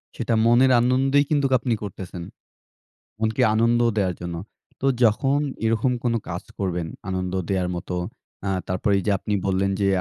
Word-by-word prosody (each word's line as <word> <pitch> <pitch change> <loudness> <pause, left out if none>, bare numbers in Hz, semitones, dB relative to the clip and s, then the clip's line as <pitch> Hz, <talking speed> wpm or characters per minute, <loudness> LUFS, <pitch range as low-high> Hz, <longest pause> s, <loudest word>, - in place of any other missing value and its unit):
সেটা 115 - -1
মনের 125 +3 +5
আনন্দেই 135 +3 +3
কিন্তু 145 -2 +2
আপনি 120 -1 -1
করতেছেন। 90 -3 -7 1.0
মনকে 110 0 0
আনন্দ 115 +2 +3 0.2
দেওয়ার 95 -4 +1
জন্য। 85 -1 -4 0.4
তো 135 - 0 0.2
যখন 135 +6 +3 0.3
এরকম 115 +3 +2
কোন 120 -1 +1
কাজ 85 +1 -4 0.2
করবেন 90 -4 -2 0.2
আনন্দ 95 -1 -2 0.2
দেওয়ার 90 -2 0
মতো। 90 +1 -5 0.5
অ্যা 100 - -2 0.2
তারপরে 95 +3 0
এই - - -2
যে, - - +2
আপনি 105 - -2
বললেন 95 +1 +1
যে, 100 - +2
105 Hz, 155 wpm, -23 LUFS, 95-120 Hz, 1.0 s, মনের